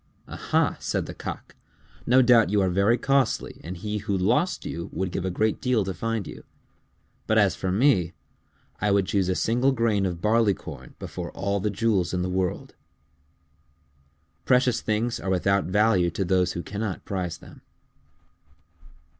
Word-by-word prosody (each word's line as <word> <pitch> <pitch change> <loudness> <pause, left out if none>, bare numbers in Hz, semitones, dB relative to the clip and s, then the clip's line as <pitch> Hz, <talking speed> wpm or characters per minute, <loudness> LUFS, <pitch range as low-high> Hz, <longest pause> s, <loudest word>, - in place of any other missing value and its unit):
"Aha!" - - 0
said - - -2
the - - -7
Cock. - - -7 0.5
"No 130 +2 +6
doubt 120 -2 +5
you 105 +1 +2
are 95 -2 +2
very 100 +6 +3
costly 135 0 0
and 90 +2 -6
he 105 +3 -3
who 100 -1 -2
lost 125 - +1
you 85 0 -5
would 95 -1 -3
give 95 - -3
a - - 0
great 110 +4 0
deal 125 -6 +1
to 95 - -3
find 115 +3 -3
you. - - -10 0.8
But - - +2
as - - +4
for 95 - -2
me, 95 - +2 0.7
I 105 - +1
would 100 -1 +3
choose 95 -1 0
a 90 - +1
single 125 +4 +2
grain 110 -6 +1
of 85 -2 -4
barleycorn 110 0 -1
before - - -6
all 100 +1 -1
the 105 +2 -1
jewels 100 -4 0
in 90 - -1
the 90 - -2
world." 95 -1 -2 1.7
_Precious 125 -1 +2
things 110 +2 -1
are 95 - -4
without 100 +1 +1
value 100 -2 +3
to 95 +3 -3
those 90 0 +1
who 85 - -5
cannot 100 -3 -5
prize 90 -4 -3
them. - - -15
100 Hz, 165 wpm, -25 LUFS, 95-115 Hz, 1.7 s, No